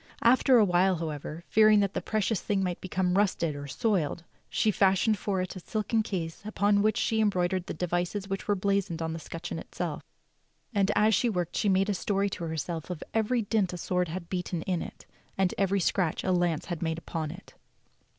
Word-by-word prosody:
After 255 +2 +5
a 220 - +6
while, 185 +1 +3
how 165 -1 -3
ever, 150 +2 -6
fearing 215 -1 +6
that 200 -1 0
the - - -2
precious 215 -1 0
thing 200 -2 0
might 180 -2 -2
become 185 -1 0
rusted 170 -6 +1
or 145 0 -6
soiled, 170 - 0 0.3
she 215 - +2
fashioned 195 +2 +3
for 190 -2 -1
it 185 - -6
a - - -6
silken 215 +4 -1
case 170 -6 -4
upon 205 -1 +2
which 215 +1 +2
she 220 -1 +1
embroidered 185 -3 +1
the - - -4
devices 180 +4 -2
which 195 0 -4
were 205 - +3
blazoned 195 -3 0
on 160 0 -2
the 165 - -5
scutcheon 165 +1 -6
itself; 165 -2 -5 0.7
and 200 -2 +2
as 215 +1 +4
she 240 - +3
worked 180 -5 -2
she 205 - +1
made 190 +1 +3
a 205 - +1
story 200 +1 0
to 175 - -4
herself 160 +1 -4
of 180 -4 -5
every 225 +2 +1
dint 205 -3 0
a - - -4
sword 180 +1 0
had 170 +1 -6
beaten 180 -2 -3
in 180 -3 -1
it, - - -9 0.3
and 190 -1 +2
every 195 0 +2
scratch 175 -2 0
a 185 - +1
lance 175 -3 +1
had 175 -4 -5
made 160 -1 -1
upon 160 -2 -4
it. 180 +5 -11
185 Hz, 210 wpm, -28 LUFS, 170-205 Hz, 0.7 s, a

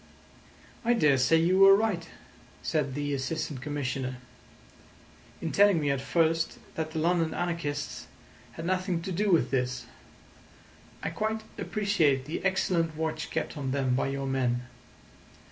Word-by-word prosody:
"I 240 +1 +3
daresay 150 - +4
you 175 +4 +3
were 195 0 +9
right," 200 -6 -1 0.5
said 140 -5 -1
the 145 0 -2
Assistant 140 0 -3
Commissioner, 130 -2 -3 1.2
"in 165 - -3
telling 200 -4 +5
me 145 -2 +1
at 135 -1 -1
first 165 +1 +1 0.2
that 160 -1 -3
the 160 - -6
London 165 0 +1
anarchists 165 -5 -3 0.5
had 165 - -7
nothing 185 -2 0
to 190 - -4
do 205 +4 0
with 170 - +3
this. 125 -1 -1 1.2
I - - -2
quite 220 0 -2 0.2
appreciate 165 -11 +1
the 155 +4 -4
excellent 175 -4 +1
watch 160 0 -2
kept - - -3
on 140 -3 -3
them 130 -1 +1
by 130 - +1
your 135 0 -3
men. 125 -2 0
160 Hz, 140 wpm, -28 LUFS, 135-180 Hz, 1.2 s, were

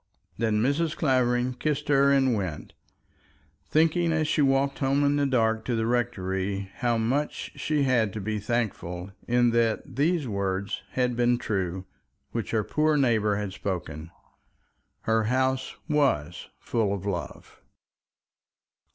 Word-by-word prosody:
Then 110 -2 +1
Mrs. 155 +5 0
Clavering 125 -3 +2
kissed 150 +3 -2
her 140 -1 +4
and 135 -2 +3
went, 95 -8 -4 1.0
thinking 165 +2 +3
as 160 -1 +1
she 155 - +1
walked 135 0 +2
home 140 +1 +2
in 145 0 +3
the 145 -1 +2
dark 115 -4 +1
to 120 - 0
the 110 0 0
rectory, 100 -5 -1
how 120 -2 +1
much 130 +7 -1
she 150 -2 0
had 120 -6 +2
to 110 - -4
be 105 +1 -2
thankful 100 -5 -3 0.2
in 120 0 +3
that 115 -1 +1
these 155 0 +1
words 100 -1 -2
had 125 -1 +1
been 120 0 +2
true 95 -5 -2 0.5
which 115 -3 -3
her 110 -2 +1
poor 155 +6 +1
neighbour 110 -6 +2
had 100 -2 -3
spoken. 85 -5 -5 0.9
Her 110 0 +1
house 130 +2 0
was 140 - 0
full 105 -4 -1
of 100 0 -7
love. 95 -4 -5
120 Hz, 140 wpm, -26 LUFS, 105-140 Hz, 1.0 s, her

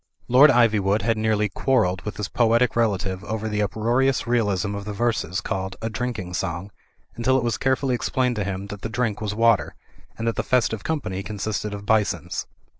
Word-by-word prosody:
Lord 130 +5 +7
Ivywood 110 -5 +3
had 115 -1 +2
nearly 110 -1 +1
quarrelled 100 -4 +1
with 105 - -6
his 105 -2 -3
poetic 115 +1 +2
relative 95 -4 0
over 110 0 -3
the 105 -1 -1
uproarious 120 +6 +1
realism 105 -5 0
of 100 0 -5
the 105 - -4
verses 110 -4 -1
called 95 -2 -3
"A 115 0 -3
Drinking 110 -6 -4
Song," 90 +1 -3 0.4
until 130 +3 +2
it 130 - 0
was 120 -2 -1
carefully 130 0 +1
explained 125 0 0
to 105 - 0
him 100 0 -4
that 105 - -10
the 115 - -4
drink 110 -2 -1
was 105 -1 -2
water, 115 -1 +3 0.4
and 115 - -3
that 115 - -1
the - - +2
festive 115 -5 +1
company 135 -12 -2
consisted 105 +1 -3
of 100 0 -7
bisons. 105 -2 0
110 Hz, 190 wpm, -23 LUFS, 100-120 Hz, 0.4 s, Lord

